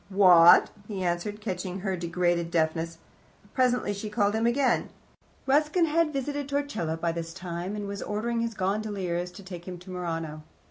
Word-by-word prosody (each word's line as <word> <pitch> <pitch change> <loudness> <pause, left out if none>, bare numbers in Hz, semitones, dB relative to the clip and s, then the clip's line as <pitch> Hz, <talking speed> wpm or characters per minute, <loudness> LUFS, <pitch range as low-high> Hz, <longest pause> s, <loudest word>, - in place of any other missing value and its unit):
"What?" 180 -4 +7 0.2
he 195 -3 -4
answered, 180 +4 -2
catching 185 -2 -4
her 190 -1 -1
degraded 175 -1 0
deafness. 165 0 0 0.6
Presently 250 -5 +2
she 205 +2 -5
called 205 -1 +1
him 225 +1 +1
again. 255 +1 +2 0.6
Ruskin 300 +5 +3
had 325 0 +2
visited 285 0 -3
Torcello 280 - -2
by 170 +1 0
this 165 0 -5
time, 180 +1 -5
and 205 -1 -4
was 200 0 -5
ordering 230 +3 -2
his 230 -1 -2
gondoliers 190 -3 -2
to 200 - -11
take 180 -2 -9
him 180 -1 -6
to 180 +2 -12
Murano. 165 -4 -4
190 Hz, 160 wpm, -27 LUFS, 175-230 Hz, 0.6 s, What